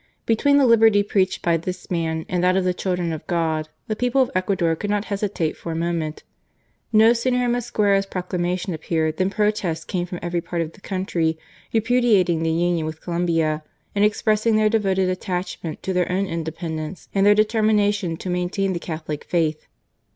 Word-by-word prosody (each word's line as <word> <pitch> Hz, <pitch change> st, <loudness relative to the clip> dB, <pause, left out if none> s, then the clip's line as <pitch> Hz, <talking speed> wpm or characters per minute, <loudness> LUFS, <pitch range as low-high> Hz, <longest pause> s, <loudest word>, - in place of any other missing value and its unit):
" -, -, -46 dB
Between 280 Hz, +6 st, +3 dB
the 280 Hz, -, +5 dB
liberty 225 Hz, -3 st, +5 dB
preached 195 Hz, -2 st, 0 dB
by 170 Hz, -1 st, +3 dB
this 180 Hz, +3 st, -6 dB
man 160 Hz, -2 st, -1 dB
and 180 Hz, -1 st, -1 dB
that 185 Hz, +1 st, +3 dB
of 190 Hz, -, +2 dB
the 180 Hz, 0 st, +1 dB
children 180 Hz, -2 st, -2 dB
of 155 Hz, -, -7 dB
God, 160 Hz, -2 st, -1 dB, 0.2 s
the 215 Hz, -, -2 dB
people 250 Hz, +3 st, +2 dB
of 255 Hz, -, -5 dB
Ecuador 185 Hz, -3 st, +1 dB
could 205 Hz, +5 st, -4 dB
not 205 Hz, 0 st, 0 dB
hesitate 195 Hz, -6 st, -1 dB
for 170 Hz, -, -6 dB
a -, -, -3 dB
moment. 165 Hz, -2 st, -2 dB, 0.7 s
No 220 Hz, +1 st, +6 dB
sooner 245 Hz, +2 st, 0 dB
had 245 Hz, -1 st, +1 dB
Mosquera's 210 Hz, -5 st, +1 dB
proclamation 180 Hz, 0 st, -2 dB
appeared 160 Hz, 0 st, -1 dB
than 185 Hz, 0 st, +1 dB
protests 205 Hz, -6 st, -1 dB
came 180 Hz, -1 st, -2 dB
from 180 Hz, -, -5 dB
every 175 Hz, 0 st, -1 dB
part 170 Hz, 0 st, -2 dB
of 160 Hz, -, -7 dB
the 205 Hz, -, -19 dB
country 175 Hz, -5 st, -1 dB, 0.3 s
repudiating 220 Hz, -7 st, +3 dB
the 165 Hz, -, +1 dB
union 170 Hz, 0 st, +1 dB
with 155 Hz, 0 st, -6 dB
Colombia, 165 Hz, -3 st, 0 dB, 0.3 s
and 205 Hz, -, +2 dB
expressing 215 Hz, +1 st, +2 dB
their 215 Hz, 0 st, +4 dB
devoted 195 Hz, -4 st, +1 dB
attachment 180 Hz, -3 st, -4 dB
to 190 Hz, -, -2 dB
their 180 Hz, -1 st, +1 dB
own 190 Hz, +2 st, +1 dB
independence 160 Hz, -1 st, -5 dB
and 195 Hz, -, +2 dB
their 205 Hz, +1 st, +6 dB
determination 210 Hz, -5 st, +2 dB
to 185 Hz, -, -8 dB
maintain 180 Hz, +2 st, -1 dB
the 170 Hz, -, -3 dB
Catholic 155 Hz, -3 st, -5 dB
Faith. 160 Hz, -3 st, -1 dB
180 Hz, 185 wpm, -22 LUFS, 165-210 Hz, 0.7 s, No